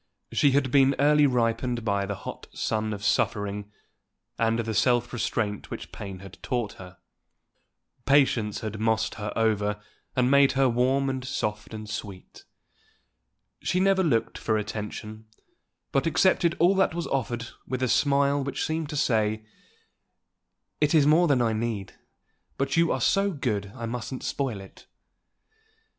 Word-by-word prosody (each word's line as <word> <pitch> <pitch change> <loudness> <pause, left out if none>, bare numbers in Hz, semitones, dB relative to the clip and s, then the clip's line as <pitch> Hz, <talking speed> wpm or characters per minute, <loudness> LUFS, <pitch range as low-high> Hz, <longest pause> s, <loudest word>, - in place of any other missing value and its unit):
She 140 -2 +3
had 135 -2 +2
been 135 0 +5
early 150 +1 +5
ripened 120 -1 0
by 100 -2 0
the 100 - -3
hot - - -8
sun 110 0 -1
of 100 -1 -5
suffering, 100 0 0 0.7
and 115 0 +2
the 115 -1 -2
self 120 +1 +2
restraint 110 -3 -2
which - - -7
pain 95 -2 -8
had 100 -1 -12
taught 120 -5 -2
her. 90 -1 -12 1.1
Patience 130 -7 +3
had 110 -1 -5
mossed 110 0 +1
her 105 0 -3
over 105 -2 +1 0.4
and 125 0 +2
made 140 -1 +5
her 135 0 +3
warm 130 +3 +2
and 130 -1 -2
soft 105 -4 -3
and 110 -1 -7
sweet. 100 -3 -8 1.2
She 180 - 0
never 195 0 +3
looked 120 -10 0
for 110 -1 0
attention, 110 +1 -6 0.6
but 135 +4 +1
accepted 170 +1 +3
all 175 +3 +4
that 190 -4 +2
was 170 - -2
offered 120 -3 -2 0.2
with 130 0 -2
a - - +2
smile 140 +3 +2
which 140 - -2
seemed 160 -1 -2
to 150 - -4
say, 110 -4 +1 1.3
"It 150 +1 +2
is 150 -3 +5
more 160 +4 +5
than 135 -5 +3
I 115 -1 +1
need, 110 -3 -3 0.6
but 135 0 -1
you 165 0 +3
are 130 - -1
so 195 +9 +3
good 115 - -2
I 120 -2 -5
mustn't 125 +2 -5
spoil 125 -8 -2
it." 95 - -15
120 Hz, 150 wpm, -26 LUFS, 110-140 Hz, 1.3 s, been